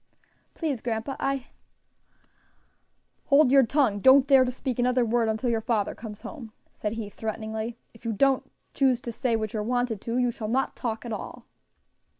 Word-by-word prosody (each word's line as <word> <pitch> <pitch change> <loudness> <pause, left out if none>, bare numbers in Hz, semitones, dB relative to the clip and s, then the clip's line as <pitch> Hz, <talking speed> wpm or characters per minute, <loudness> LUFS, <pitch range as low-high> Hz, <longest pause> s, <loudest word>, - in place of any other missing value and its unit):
"Please, 290 -8 -2
grandpa, 230 +3 -3
I 275 -2 -1 0.9
" - - -41
"Hold 280 -2 +5
your 275 -1 +7
tongue! 235 -4 +2
don't 265 +4 +7
dare 270 -2 +6
to 250 - -1
speak 255 -1 -4
another 250 0 +2
word 230 0 +1
until 220 +3 0
your 225 -1 0
father 220 -3 0
comes 215 -2 -9
home," 235 -9 -9 0.2
said 210 0 -3
he, 225 -2 -4
threateningly. 220 +2 -5 0.2
"If 225 - -19
you 230 - -1
don't 265 +5 +2 0.2
choose 260 -3 +2
to 240 - -5
say 235 0 0
what 215 -2 -3
you're 215 - -1
wanted 245 -1 -1
to, 230 +1 -2
you 245 -1 +2
shall 220 -2 -6
not 260 +5 0
talk 230 -2 -4
at 235 - -4
all." - - -7
235 Hz, 180 wpm, -26 LUFS, 220-260 Hz, 0.9 s, your